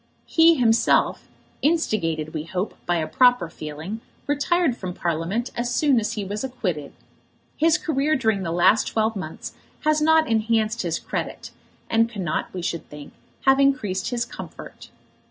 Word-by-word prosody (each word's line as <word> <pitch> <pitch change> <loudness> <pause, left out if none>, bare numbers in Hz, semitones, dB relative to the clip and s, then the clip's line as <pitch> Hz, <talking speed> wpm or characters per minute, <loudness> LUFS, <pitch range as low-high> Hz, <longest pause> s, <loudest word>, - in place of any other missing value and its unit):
He 330 0 +5
himself, 235 -4 +2 0.3
instigated, 165 - 0
we 155 -1 -4
hope, 185 +3 -3
by 175 - +2
a 160 -2 0
proper 245 -4 +3
feeling, 155 +10 -7 0.2
retired 290 0 +1
from 185 -5 -6
Parliament 175 +9 -2
as 240 0 -2
soon 270 0 +3
as 215 - -2
he 205 -2 -4
was 205 +4 -4
acquitted. 185 - -3 0.6
His 320 +1 +3
career 305 0 0
during 220 -6 +1
the 170 -3 -3
last 175 +5 +4
twelve 220 0 0
months 160 -5 -6 0.3
has 305 0 +2
not 320 +1 +4
enhanced 225 0 +1
his 170 -2 -1
credit, - - -5 0.4
and 230 0 +2
cannot, 190 -8 -3
we 180 -2 -6
should 170 -1 -4
think, 150 -1 -11 0.3
have 270 0 +5
increased 255 -9 +1
his 240 -2 -1
comfort. - - -10
220 Hz, 155 wpm, -23 LUFS, 175-265 Hz, 0.6 s, He